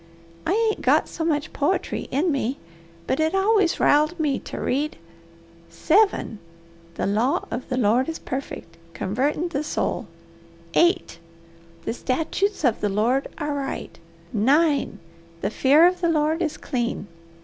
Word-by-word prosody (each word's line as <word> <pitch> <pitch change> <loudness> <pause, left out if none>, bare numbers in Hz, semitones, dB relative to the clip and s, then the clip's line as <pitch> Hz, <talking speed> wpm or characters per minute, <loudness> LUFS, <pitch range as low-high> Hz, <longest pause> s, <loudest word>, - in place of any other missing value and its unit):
I 355 - +2
ain't 440 0 +1
got - - +3
so 325 - -5
much 305 -2 -1
poetry 300 +7 -1
in 315 +6 +1
me, 270 -2 -1 0.5
but 265 - -1
it 315 +4 +1
always 390 -2 +2
riled 305 +4 +3
me 290 -4 +1
to - - -7
read, 290 +4 -1 0.7
'7. 390 - +2 0.6
The - - -2
law 220 +7 +1
of 245 +2 -5
the 255 - -1
Lord 245 +5 +2
is 325 - -4
perfect, 255 -10 -6 0.2
covertin' 280 - -1
the 290 -2 -2
soul. 275 -6 -2 0.7
8. 345 - +2 0.7
The - - -1
statutes 320 - -1
of 245 -5 +2
the 210 - +1
Lord 230 +7 +1
are 295 -2 -2
right. 275 -9 -5 0.3
9. 285 +7 +2 0.4
The 200 - -1
fear 285 +8 +5
of 360 0 +2
the 340 - +2
Lord 315 +1 +1
is 315 -3 -1
clean.' 240 -6 -3
295 Hz, 145 wpm, -24 LUFS, 255-330 Hz, 0.7 s, fear